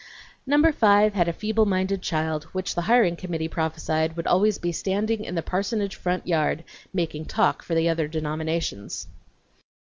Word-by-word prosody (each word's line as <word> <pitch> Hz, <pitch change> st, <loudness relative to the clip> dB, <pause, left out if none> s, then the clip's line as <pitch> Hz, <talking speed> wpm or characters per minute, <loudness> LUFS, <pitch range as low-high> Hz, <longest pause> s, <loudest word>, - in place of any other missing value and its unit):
Number 295 Hz, +4 st, +5 dB
five 210 Hz, -5 st, +4 dB
had 175 Hz, -4 st, +2 dB
a -, -, +2 dB
feeble 215 Hz, +4 st, +1 dB
minded 190 Hz, 0 st, 0 dB
child, 155 Hz, -3 st, -1 dB
which 185 Hz, -1 st, -2 dB
the 175 Hz, -, -1 dB
hiring 230 Hz, -8 st, +5 dB
committee 170 Hz, -3 st, -3 dB
prophesied, 160 Hz, 0 st, -1 dB
would 165 Hz, -, -3 dB
always 205 Hz, +3 st, +3 dB
be 175 Hz, -, -2 dB
standing 210 Hz, +5 st, -1 dB
in 180 Hz, -, -5 dB
the 165 Hz, -, -1 dB
parsonage 200 Hz, +2 st, -2 dB
front 180 Hz, 0 st, -2 dB
yard, 160 Hz, -1 st, 0 dB, 0.3 s
making 160 Hz, -4 st, -2 dB
talk 225 Hz, +6 st, +1 dB
for 165 Hz, -, -3 dB
the 165 Hz, +1 st, +3 dB
other 165 Hz, -2 st, +1 dB
denominations. 155 Hz, -, -3 dB
175 Hz, 160 wpm, -25 LUFS, 160-205 Hz, 0.3 s, Number